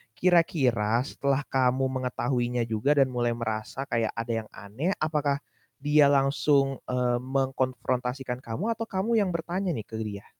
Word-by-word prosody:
kira-kira 130 -10 +2
setelah 140 -1 -1
kamu 130 0 +1
mengetahuinya 125 -1 -1
juga 115 +6 +1
dan 135 -2 +3
mulai 120 -1 0
merasa 110 +3 -3
kayak 115 -4 -1
ada 115 0 -3 0.2
yang - - -37
aneh, 130 - -3
apakah 150 -3 0 0.4
dia 145 +1 +4
langsung, 140 0 +2
eee, 125 -1 +1
mengkonfrontasikan 130 -1 -1
kamu 130 - -3
atau 225 0 -5
kamu 215 +4 +1
yang 200 - +1
bertanya 175 +1 -2
nih 110 - -4
ke 110 - -7
dia? 100 -2 -6
130 Hz, 145 wpm, -27 LUFS, 120-145 Hz, 0.4 s, dia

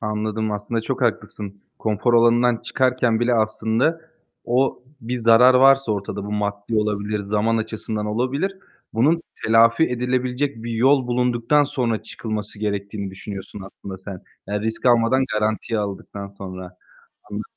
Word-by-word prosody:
Anladım, 105 0 -2
aslında 105 +3 -2
çok 115 - -3
haklısın. 100 -1 -2 0.2
Konfor 110 +3 +1
alanından 120 +1 +4
çıkarken 125 -2 +1
bile 120 0 +2
aslında 110 +8 +1 0.4
o 125 +1 +1 0.2
bir 125 +1 -3
zarar 115 +3 +6
varsa 135 -2 +5
ortada, 100 0 -4
bu 105 - -5
maddi 105 +1 -2
olabilir, 105 0 -1
zaman 105 +3 +1
açısından 110 -1 -3
olabilir, 135 - -1 0.4
bunun 155 +9 +3 0.2
telafi 115 +5 +5
edilebilecek 125 +1 -1
bir 120 - -5
yol 130 +3 +3
bulunduktan 125 +3 +2
sonra 120 -6 -1
çıkılması 105 -2 -6
gerektiğini 100 -1 -3
düşünüyorsun 100 +1 -8
aslında 95 -1 -9
sen. 95 -1 -9 0.2
Yani 105 0 -2
risk 110 +3 -2
almadan 120 +2 +4
garantiye 110 +1 -1
aldıktan 100 0 -5
sonra. 95 -2 -9 0.5
Anla 105 +1 -4
110 Hz, 135 wpm, -22 LUFS, 105-125 Hz, 0.5 s, zarar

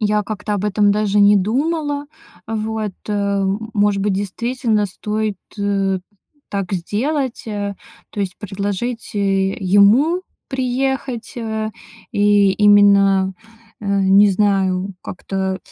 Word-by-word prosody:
я 210 0 +1
как-то 210 0 -4
об 205 0 -2
этом 210 0 +3
даже 210 0 +1
не 205 0 +6
думала. 290 - -1 0.4
Вот, 220 -1 -3 0.2
э. 200 -1 0 0.3
Может 205 -1 +1
быть, 205 -1 +1
действительно 215 +2 -1
стоит, 210 +1 -3 0.2
э, 195 -2 0 0.5
так 195 -1 -3
сделать, 250 - -2
э? 205 -2 -3 0.4
То 205 - -5
есть 190 -2 -3
предложить, 205 +4 -4
э, 195 -1 +1
ему 215 - +4 0.3
приехать, 260 -2 -2
э, 220 -2 -3 0.4
и 205 -1 +4
именно, 200 -2 +5 0.5
э, 210 - -7
не 200 +1 +5
знаю, 195 -1 +1
как-то 190 +1 -3
205 Hz, 115 wpm, -19 LUFS, 195-220 Hz, 0.5 s, не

